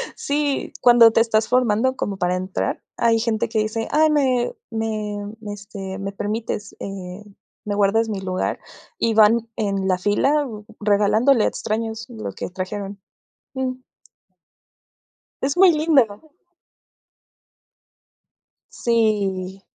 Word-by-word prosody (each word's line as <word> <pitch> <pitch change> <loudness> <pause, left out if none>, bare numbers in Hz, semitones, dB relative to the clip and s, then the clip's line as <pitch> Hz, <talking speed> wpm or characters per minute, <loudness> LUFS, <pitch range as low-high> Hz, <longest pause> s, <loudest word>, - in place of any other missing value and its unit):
sí, 285 -1 -1
cuando 240 -2 +7
te 225 - +3
estás 220 -1 +2
formando 250 +1 +2
como 200 -5 -3
para 180 0 0
entrar, 185 +1 -3 0.2
hay 230 -1 +3
gente 225 -1 0
que 220 0 -1
dice: 220 +1 -2
"Ay, 310 +1 +4
me 260 -5 +1 0.2
me, 215 -2 -3 0.4
este, 195 -1 -7
me 195 0 -4
permites, 210 0 -4
eh, 195 0 -7 0.4
me 205 - -2
guardas 210 +3 +2
mi 205 - -3
lugar", 185 -1 -2 0.4
y 230 - +1
van 220 +2 +4
en 195 -3 -1
la 185 - +2
fila 275 +10 +2 0.4
regalándole 215 +4 +3
a - - +3
extraños 225 +1 -3
lo 225 -2 -6
que - - -5
trajeron. 195 +2 -6 0.5
Mm. 255 -1 -3 1.6
Es 275 +4 -1
muy 370 -1 +7
lindo. 280 -10 +2 2.5
Sí. 200 -5 0
220 Hz, 120 wpm, -22 LUFS, 200-240 Hz, 2.5 s, cuando